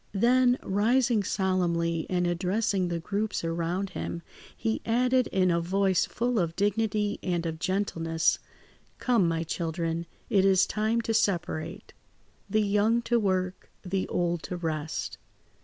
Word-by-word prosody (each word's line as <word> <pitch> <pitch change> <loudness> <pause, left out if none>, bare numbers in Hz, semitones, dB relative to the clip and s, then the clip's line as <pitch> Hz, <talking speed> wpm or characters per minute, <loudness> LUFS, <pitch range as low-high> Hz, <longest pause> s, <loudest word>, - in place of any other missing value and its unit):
Then, 250 +3 +4
rising 230 +3 +2
solemnly 175 -4 0
and 180 -1 +1
addressing 185 +2 0
the 170 -1 -2
groups 205 +4 -2
around 170 +3 -2
him, 170 - -5 0.3
he 225 -1 -1
added 250 +2 +2
in 185 -2 +2
a 170 - +2
voice 190 +1 +1
full 240 0 0
of 165 -2 -1
dignity 205 +1 0
and 175 -2 -1
of 160 -1 -3
gentleness. 165 -4 0 0.6
"Come, 235 -8 +2
my 165 0 0
children, 165 0 -3 0.2
it 200 -5 +3
is 195 -1 +5
time 220 +2 0
to 225 0 -2
separate. 180 -7 -1 0.6
The 215 0 +2
young 210 +3 +2
to 235 0 +2
work, 185 -3 -1
the 190 0 -2
old 175 -1 -1
to 180 - -3
rest. 160 -2 -3
190 Hz, 140 wpm, -28 LUFS, 170-215 Hz, 0.6 s, is